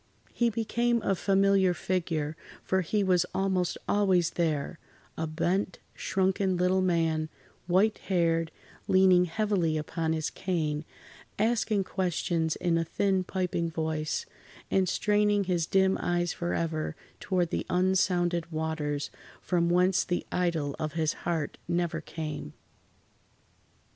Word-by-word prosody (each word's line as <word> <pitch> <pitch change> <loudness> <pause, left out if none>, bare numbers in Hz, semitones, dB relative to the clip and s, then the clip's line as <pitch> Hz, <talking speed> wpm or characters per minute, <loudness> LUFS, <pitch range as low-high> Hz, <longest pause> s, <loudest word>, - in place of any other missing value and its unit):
He 235 -1 +2
became 235 +2 0
a 195 - +2
familiar 195 -1 +3
figure, 160 -4 -2 0.3
for 190 0 +1
he 205 +4 0
was 180 -2 +3
almost 190 -2 0
always 190 -4 +3
there—a 160 0 -3
bent, 175 +5 -1 0.2
shrunken 190 0 0
little 180 +1 +2
man, 165 -3 +1 0.4
white 195 +5 +3
haired, 165 -3 +2 0.4
leaning 185 -1 +5
heavily 180 -3 0
upon 160 +1 -2
his 155 -1 -2
cane, 160 -5 -2 0.5
asking 220 -2 +1
questions 170 -3 -1
in 170 -2 +1
a - - +1
thin 190 +3 0
piping 180 -2 -1
voice, 155 -1 -2 0.5
and 190 -2 +2
straining 210 +1 +2
his 175 -3 0
dim 190 0 +3
eyes 175 -1 0
forever 165 -2 -2 0.2
toward 180 -3 0
the - - -2
unsounded 180 -2 +1
waters, 155 -2 -2 0.3
from 170 -2 +1
whence 180 +1 +3
the 175 - -2
idol 165 -6 0
of 155 -1 -3
his 160 -1 0 0.2
heart 160 -4 -2
never 175 -1 -1
came. 150 - -6
175 Hz, 120 wpm, -28 LUFS, 160-190 Hz, 0.5 s, leaning